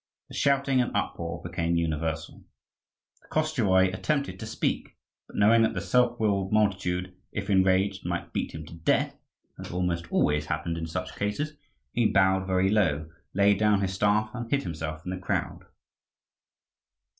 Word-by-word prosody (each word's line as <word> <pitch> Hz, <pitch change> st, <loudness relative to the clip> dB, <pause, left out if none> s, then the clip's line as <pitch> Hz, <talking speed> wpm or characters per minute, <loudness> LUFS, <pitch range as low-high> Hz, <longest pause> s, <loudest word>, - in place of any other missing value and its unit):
The -, -, -12 dB
shouting 140 Hz, -2 st, +2 dB
and 120 Hz, -, 0 dB
uproar 85 Hz, 0 st, -3 dB
became 85 Hz, -1 st, -1 dB
universal. 80 Hz, -1 st, -2 dB, 0.8 s
The -, -, -23 dB
Koschevoi 105 Hz, -13 st, +2 dB
attempted 140 Hz, +8 st, -1 dB
to 110 Hz, -, -6 dB
speak; 110 Hz, -, -2 dB, 0.3 s
but -, -, -15 dB
knowing 110 Hz, +3 st, +5 dB
that 115 Hz, -, +2 dB
the -, -, 0 dB
self 125 Hz, -1 st, +2 dB
willed 100 Hz, -3 st, +1 dB
multitude, 95 Hz, -4 st, +1 dB, 0.2 s
if 100 Hz, 0 st, -3 dB
enraged, 95 Hz, +1 st, +3 dB
might 85 Hz, 0 st, -4 dB
beat -, -, -2 dB
him 80 Hz, 0 st, -7 dB
to 80 Hz, -, -12 dB
death, 85 Hz, -1 st, +1 dB, 0.4 s
as -, -, -7 dB
almost 85 Hz, -2 st, -2 dB
always 75 Hz, 0 st, +2 dB
happened 85 Hz, +1 st, -2 dB
in 80 Hz, 0 st, -4 dB
such 80 Hz, -, -4 dB
cases, 105 Hz, +10 st, -2 dB, 0.4 s
he 120 Hz, -, +3 dB
bowed 95 Hz, -1 st, +3 dB
very 95 Hz, 0 st, +2 dB
low, 80 Hz, -7 st, +1 dB, 0.2 s
laid 100 Hz, 0 st, +4 dB
down 105 Hz, -2 st, +3 dB
his 95 Hz, -1 st, -1 dB
staff, 105 Hz, +3 st, +2 dB
and 120 Hz, -1 st, -5 dB
hid 140 Hz, +1 st, +1 dB
himself 80 Hz, -1 st, -5 dB
in 90 Hz, -, -3 dB
the 95 Hz, -, -4 dB
crowd. 90 Hz, -, -2 dB
95 Hz, 160 wpm, -27 LUFS, 85-110 Hz, 0.8 s, knowing